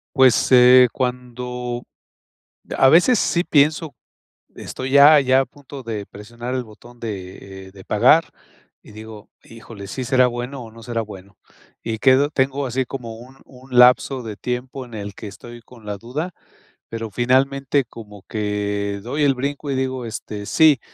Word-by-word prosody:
Pues, 130 Hz, -3 st, +4 dB
eh, 125 Hz, 0 st, +8 dB
cuando 125 Hz, -1 st, -4 dB, 0.9 s
a 135 Hz, -, +5 dB
veces 185 Hz, +8 st, +5 dB
sí 175 Hz, 0 st, +1 dB
pienso, 150 Hz, 0 st, +2 dB, 0.6 s
estoy 130 Hz, +1 st, -6 dB
ya 145 Hz, +2 st, +8 dB
ya 130 Hz, 0 st, +3 dB
a -, -, +1 dB
punto 140 Hz, -1 st, -12 dB
de 110 Hz, -4 st, -5 dB
presionar 120 Hz, +4 st, -8 dB
el 130 Hz, -1 st, -2 dB
botón 120 Hz, +2 st, -16 dB
de, 95 Hz, -2 st, -8 dB
eh, -, -, -18 dB
de 95 Hz, -1 st, -14 dB
pagar 130 Hz, +10 st, +4 dB, 0.6 s
y -, -, -16 dB
digo: 110 Hz, 0 st, -11 dB
"Híjole, 115 Hz, -3 st, -11 dB
¿sí 130 Hz, +6 st, -5 dB
será 130 Hz, 0 st, +3 dB
bueno 125 Hz, +2 st, -6 dB
o 115 Hz, -, -11 dB
no 115 Hz, +1 st, -14 dB
será 115 Hz, -1 st, -3 dB
bueno?". 100 Hz, -2 st, -12 dB, 0.5 s
Y 110 Hz, -1 st, -4 dB
quedo 135 Hz, +4 st, +4 dB
tengo 135 Hz, -1 st, 0 dB
así 130 Hz, +1 st, -1 dB
como 120 Hz, -4 st, -7 dB
un 130 Hz, +3 st, -14 dB
un 125 Hz, -1 st, -6 dB
lapso 125 Hz, +1 st, +5 dB
de 110 Hz, -3 st, -7 dB
tiempo 125 Hz, +3 st, -5 dB
en 120 Hz, -, -13 dB
el 100 Hz, -1 st, -6 dB
que -, -, -9 dB
estoy 120 Hz, +4 st, -12 dB
con 115 Hz, -3 st, -17 dB
la 105 Hz, -1 st, -5 dB
duda, 145 Hz, -, -5 dB, 0.6 s
pero 115 Hz, -1 st, -5 dB
finalmente 135 Hz, +5 st, +1 dB
como 105 Hz, -4 st, -12 dB
que 105 Hz, -1 st, -2 dB
doy 145 Hz, +6 st, -2 dB
el 140 Hz, -1 st, +4 dB
brinco 140 Hz, +2 st, -4 dB
y -, -, -1 dB
digo, 130 Hz, -1 st, -2 dB
este: 105 Hz, -2 st, -7 dB
"Sí". 155 Hz, +2 st, +4 dB
125 Hz, 165 wpm, -21 LUFS, 110-135 Hz, 0.9 s, eh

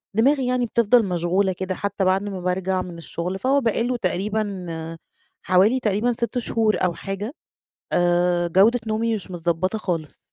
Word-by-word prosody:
دماغي 265 Hz, +3 st, +3 dB
يعني 250 Hz, -1 st, +1 dB
بتفضَل 235 Hz, 0 st, +3 dB
مشغولة 180 Hz, +1 st, +1 dB
كده 185 Hz, +1 st, -4 dB
حتى 200 Hz, 0 st, -2 dB
بعد 190 Hz, +2 st, +2 dB
ما 195 Hz, -3 st, -5 dB
بارجع 185 Hz, +1 st, 0 dB
من 175 Hz, -2 st, -8 dB
الشغل، 175 Hz, +3 st, -4 dB
فهو 275 Hz, +2 st, +2 dB
بقى 230 Hz, -1 st, +1 dB
له 245 Hz, +1 st, -1 dB
تقريبًا 205 Hz, +1 st, -1 dB, 0.9 s
حوالي 195 Hz, +8 st, +4 dB
تقريبًا 220 Hz, +2 st, +1 dB
6 235 Hz, +2 st, -3 dB
شهور 225 Hz, -2 st, +1 dB
أو 175 Hz, -, 0 dB
حاجة 195 Hz, +7 st, -5 dB, 0.6 s
آآ، 175 Hz, 0 st, +2 dB
جودة 210 Hz, +8 st, +4 dB
نومي 225 Hz, +1 st, 0 dB
مش 200 Hz, -4 st, -6 dB
متضبّطة 175 Hz, +4 st, -1 dB
خالص. 165 Hz, -7 st, -4 dB
195 Hz, 155 wpm, -23 LUFS, 180-230 Hz, 0.9 s, حوالي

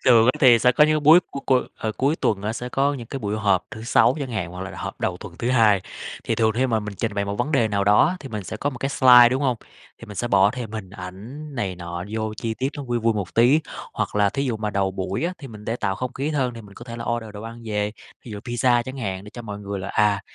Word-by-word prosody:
Thường 115 Hz, -3 st, +6 dB
á 125 Hz, -, +5 dB
thì 125 Hz, -5 st, +7 dB
sẽ 125 Hz, +2 st, +4 dB
có 150 Hz, -, +5 dB
những 155 Hz, 0 st, +2 dB
búi 155 Hz, +4 st, +8 dB
c -, -, -34 dB, 0.2 s
cu, 130 Hz, -, +5 dB, 0.2 s
ờ, 110 Hz, -, -3 dB
cuối 140 Hz, +4 st, +1 dB
tuần 100 Hz, -10 st, 0 dB
á 105 Hz, +1 st, -1 dB
sẽ 120 Hz, +2 st, -5 dB
có 140 Hz, +3 st, +1 dB
những 120 Hz, -4 st, -7 dB
cái 135 Hz, -, -5 dB
buổi 105 Hz, -3 st, -2 dB
họp 100 Hz, -4 st, +2 dB
thứ 110 Hz, -, -8 dB
Sáu 120 Hz, +2 st, +4 dB
chẳng 135 Hz, -3 st, -4 dB
hạn, 100 Hz, -7 st, -3 dB
hoặc 90 Hz, +1 st, -8 dB
là -, -, -9 dB
họp -, -, -6 dB
đầu 90 Hz, -, -1 dB
tuần 90 Hz, -2 st, -10 dB
thứ 120 Hz, -, -1 dB
Hai. 110 Hz, -6 st, +4 dB, 0.4 s
Thì -, -, 0 dB
thường 110 Hz, -1 st, +2 dB
khi 125 Hz, +4 st, +1 dB
mà 115 Hz, -3 st, +1 dB
mình 105 Hz, -1 st, -6 dB
trình 110 Hz, +1 st, -3 dB
bày 100 Hz, -, 0 dB
một 100 Hz, 0 st, -3 dB
vấn 135 Hz, +7 st, -1 dB
đề 120 Hz, -6 st, +3 dB
nào 100 Hz, -2 st, 0 dB
đó 105 Hz, +1 st, +5 dB
á 180 Hz, -, -1 dB
thì 135 Hz, -, -8 dB
mình 105 Hz, -5 st, -5 dB
sẽ 110 Hz, -, -5 dB
có 140 Hz, +6 st, -1 dB
một 130 Hz, -, -9 dB
cái 135 Hz, -, -1 dB
slide, 125 Hz, -3 st, +7 dB
đúng 130 Hz, +3 st, -1 dB
hông? 130 Hz, -3 st, +1 dB, 0.4 s
Thì 115 Hz, -, -11 dB
mình 105 Hz, -, -9 dB
sẽ 120 Hz, -, -2 dB
bỏ 100 Hz, -1 st, +5 dB
thêm 115 Hz, -2 st, -6 dB
hình 105 Hz, -4 st, -6 dB
ảnh 105 Hz, +11 st, -9 dB
này 100 Hz, -7 st, -2 dB
nọ 85 Hz, 0 st, -6 dB
vô 110 Hz, 0 st, -3 dB
chi 115 Hz, +1 st, -3 dB
tiết 130 Hz, +1 st, 0 dB
nó 145 Hz, -, -5 dB
vui 120 Hz, -3 st, -1 dB
vui 115 Hz, 0 st, +2 dB
một 100 Hz, -4 st, -4 dB
tí, 125 Hz, +7 st, +5 dB, 0.3 s
hoặc -, -, -3 dB
là 105 Hz, -1 st, +4 dB
thí 135 Hz, +6 st, -2 dB
dụ 120 Hz, -4 st, -1 dB
mà 105 Hz, -1 st, -3 dB
đầu 100 Hz, -1 st, 0 dB
buổi 95 Hz, -, -3 dB
á 175 Hz, -, -1 dB
thì 140 Hz, -4 st, -9 dB
mình 105 Hz, -2 st, -11 dB
để 115 Hz, +2 st, -2 dB
tạo 95 Hz, -5 st, -1 dB
không 125 Hz, +5 st, -4 dB
khí 140 Hz, +3 st, -3 dB
hơn 130 Hz, -5 st, 0 dB
thì 115 Hz, -, -8 dB
mình 100 Hz, -1 st, -15 dB
có 120 Hz, -, -11 dB
thể 115 Hz, -1 st, -7 dB
là 115 Hz, -, -5 dB
order 120 Hz, -2 st, -2 dB
đồ 105 Hz, -, -7 dB
ăn 115 Hz, +1 st, -9 dB
về, 105 Hz, -1 st, -1 dB, 0.3 s
ví 120 Hz, -, -9 dB
dụ 105 Hz, -, -6 dB
pizza 120 Hz, +1 st, +1 dB
chẳng 130 Hz, +3 st, -7 dB
hạn 95 Hz, -6 st, -4 dB
để 105 Hz, -, -11 dB
cho 120 Hz, -, -9 dB
mọi 105 Hz, -2 st, -6 dB
người 100 Hz, -1 st, -5 dB
là, 95 Hz, -, -5 dB
à, 105 Hz, -1 st, +2 dB
115 Hz, 305 wpm, -23 LUFS, 105-125 Hz, 0.4 s, búi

